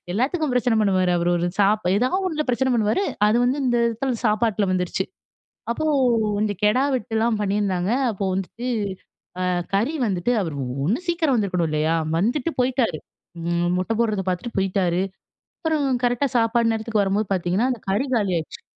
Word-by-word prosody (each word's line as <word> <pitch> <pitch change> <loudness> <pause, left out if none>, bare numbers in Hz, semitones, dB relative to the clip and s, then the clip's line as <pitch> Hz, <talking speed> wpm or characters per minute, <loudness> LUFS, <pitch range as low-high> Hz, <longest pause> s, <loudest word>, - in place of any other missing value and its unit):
எல்லாத்துக்கும் 275 - 0
பிரச்சனை 245 -1 +2
பண்ணுவாரு. 185 -3 +2
அவரு 170 +1 0
ஒரு 175 +1 0
சாப் 205 +1 +3
ஏதாவது 255 - +1
ஒண்ணுல 310 -4 -1
பிரச்சனை 260 +2 +1
பண்ணுவாரு. 220 - +1 0.2
அது 215 +2 +3
வந்து 260 +4 +1
இந்த 240 -1 +2
இடத்துல 235 +2 -1
சாப்பாட்டில 215 -1 +2
வந்துருச்சு. 180 -1 -1 0.7
அப்போ 275 +6 -2 0.5
கொஞ்சம் 205 -3 -1
கெடா 245 +6 +3
வெட்டுலாம் 225 -2 0
பண்ணியிருந்தாங்க. 195 -2 0 0.2
அப்போ 195 -2 -3
வந்துட்டு 230 +6 -4 0.7
அ - - 0 0.3
கறி 235 +11 +1
வந்துட்டு 195 +4 0
அவர் 160 -5 -4 0.3
ஒண்ணு 215 - +1
சீக்கிரம் 320 -7 +2
வந்துருக்கணும் 180 -6 0
இல்லயா? 155 +2 +1 0.2
வந்துட்டு 250 - 0
போய்ட்டாரு. 250 - +1 0.4
அ - - -7 0.4
மொட்டை 185 +5 -1
போடுறதை 215 -5 0
பார்த்துட்டு 210 +6 -3
போய்ட்டாரு. 185 -2 +1 0.6
அப்புறம் 315 -3 0 0.2
கரெக்ட்‌டா 245 +3 +1
சாப்பாடு 230 0 +2
நேரத்துக்கு 220 -2 0
வரும்போது 200 +1 0
பார்த்திங்கன்னா, 185 +6 +1
அந்த 240 - -4
கறி 205 +8 +1
காலியாயிடுச்சு. 185 -7 -1
215 Hz, 150 wpm, -23 LUFS, 190-245 Hz, 0.7 s, சாப்